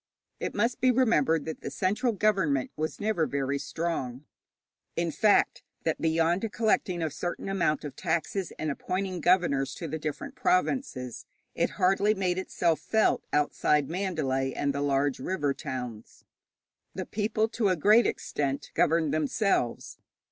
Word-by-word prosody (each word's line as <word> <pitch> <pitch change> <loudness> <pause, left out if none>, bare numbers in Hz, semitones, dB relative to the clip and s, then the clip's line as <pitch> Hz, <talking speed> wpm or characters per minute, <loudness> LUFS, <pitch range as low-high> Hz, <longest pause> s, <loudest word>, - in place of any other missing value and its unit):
It - - -4
must 235 +4 0
be 255 - +5
remembered 165 - +3
that 160 - -6
the - - -4
central 215 +6 0
government 190 - +1
was 155 +1 -3
never 205 -6 +1
very 140 0 -1
strong 145 -4 -3 0.7
in 170 -1 0
fact, 210 +5 +3 0.2
that 160 - -1
beyond 165 +6 +1
collecting 200 -6 +1
a 160 - -1
certain 175 +6 -4
amount 170 -6 0
of 145 -3 -6
taxes, 170 +2 -1
and 155 -1 -2
appointing 185 +4 -3
governors 145 -7 +2
to 165 - -5
the 160 +1 -4
different 155 -1 -5
provinces, 180 - -1 0.3
it - - +1
hardly 195 +3 +3
made 185 -2 0
itself 170 -3 0
felt 220 -1 +2
outside 150 0 +2
Mandalay 150 -8 -1
and 140 -1 -1
the 140 - -2
large 140 -1 +1
river 145 -2 -1
towns. 125 -6 -7 0.7
The - - -3
people 215 +1 0
to 220 -3 +1
a 185 - +3
great 210 +7 +5
extent 140 -1 -2
governed 160 -2 +2
themselves. 155 - 0
165 Hz, 145 wpm, -28 LUFS, 145-195 Hz, 0.7 s, be